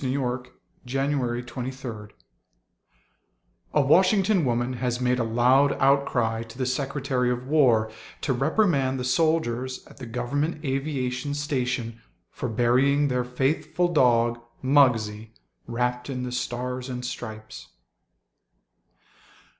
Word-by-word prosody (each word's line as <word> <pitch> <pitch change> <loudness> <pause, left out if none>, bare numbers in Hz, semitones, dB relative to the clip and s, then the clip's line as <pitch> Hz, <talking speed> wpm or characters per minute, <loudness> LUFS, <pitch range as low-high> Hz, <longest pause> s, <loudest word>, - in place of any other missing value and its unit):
THE 130 0 0
FLAG 125 -2 -2 0.5
AND 135 +2 +1
THE 120 +1 -3
FAITHFUL 115 -5 -7 1.7
(A 150 - +5
Washington 190 +5 +4
woman 120 0 0
has 125 -1 -1
made 125 0 +1
a - - +2
loud 125 +5 +3
outcry 135 -5 +2
to 115 0 -10
the 130 - -1
Secretary 130 -1 -1
of 125 0 -2
War 125 -7 +3 0.3
to 135 - 0
reprimand 135 - +1
the - - -2
soldiers 130 -2 0
at - - -17
the 130 -3 -8
Government 145 +7 -2
Aviation 135 0 -2
Station 125 -5 -2 0.3
for 125 - -4
burying 130 +5 +3
their 125 -1 0
faithful 150 +7 0
dog, 120 -4 +3 0.2
Muggsie, 115 -6 +2 0.3
wrapped 125 +2 -2
in 125 -2 -3
the 125 - -4
Stars 125 +1 -3
and 125 0 -5
Stripes.) 110 -4 -7
125 Hz, 120 wpm, -25 LUFS, 120-140 Hz, 1.7 s, A